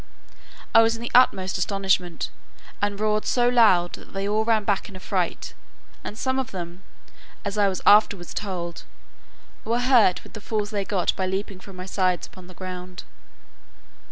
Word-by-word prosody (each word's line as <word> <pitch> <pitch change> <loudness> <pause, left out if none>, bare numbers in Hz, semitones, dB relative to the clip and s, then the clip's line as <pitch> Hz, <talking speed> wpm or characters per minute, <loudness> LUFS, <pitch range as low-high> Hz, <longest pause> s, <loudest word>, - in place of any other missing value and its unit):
I 225 - +8
was 225 0 +2
in 225 - -8
the 240 - -5
utmost 190 -7 +4
astonishment, 190 -2 0 0.5
and 205 0 -1
roared 215 0 +1
so 245 -1 +2
loud, 215 -8 +4
that - - -11
they 195 0 -2
all 215 +1 +1
ran 220 -1 +2
back 205 -1 -1
in 195 - -12
a - - -8
fright; 185 -2 -2 0.5
and 210 - -7
some 260 +2 -1
of 260 - -3
them, 175 -1 -7 0.6
as 200 0 -3
I 205 -1 +3
was 190 -1 -3
afterwards 205 -4 +4
told, 175 -4 -4 0.8
were 230 +2 0
hurt 245 -8 +4
with - - -15
the 215 - -8
falls 210 0 -2
they 200 -2 -2
got 190 -4 0
by 190 - -1
leaping 190 0 -3
from 195 0 -12
my 185 0 -7
sides 185 -2 0
upon 185 -1 -14
the 185 - -14
ground. 180 -1 -7
195 Hz, 180 wpm, -24 LUFS, 185-215 Hz, 0.8 s, I